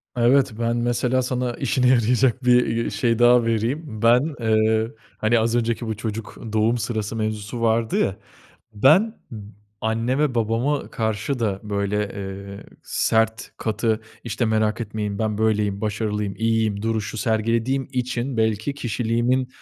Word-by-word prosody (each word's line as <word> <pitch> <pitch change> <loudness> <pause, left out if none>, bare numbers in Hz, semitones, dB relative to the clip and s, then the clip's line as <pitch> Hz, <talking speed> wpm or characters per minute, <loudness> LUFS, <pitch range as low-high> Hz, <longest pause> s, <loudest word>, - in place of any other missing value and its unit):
Evet, 125 +2 +3
ben 115 0 0
mesela 120 +2 +1
sana 125 -1 -2
işine 125 +1 +1
yarayacak 125 +1 +3
bir, 125 0 +5
eee, 115 +1 -1
şey, 115 -2 0
daha 120 0 +5
vereyim. 115 +6 0 0.2
Ben, 125 +6 +3
eee, 110 0 +2 0.3
hani, 115 +2 +2
az 115 +1 +1
önceki 115 0 -1
bu 110 - -2
çocuk 110 0 -5 0.2
doğum 110 +2 +2
sırası 110 -2 -3
mevzusu 110 +1 -3
vardı 115 0 +1
ya. 95 - +1 0.6
Ben 165 - +4 0.2
b 115 - -6 0.4
anneme 125 +5 0
babama 115 +6 0
karşı 110 +4 -2
da 100 -4 -1
böyle, 100 -1 -2 0.2
eee, 100 0 -7 0.2
sert 110 0 0
katı 110 0 -1 0.2
işte 120 +1 -1
merak 110 0 +1
etmeyin 105 -2 -4
ben 110 -2 -1
böyleyim, 105 -2 +1
başarılıyım, 105 -1 -2
iyiyim 110 -2 0
duruşu 110 -1 -2
sergilediğim 115 +4 0
için 125 0 -2
belki 110 +4 0
kişiliğimin, 120 +1 0
115 Hz, 140 wpm, -23 LUFS, 110-120 Hz, 0.6 s, bir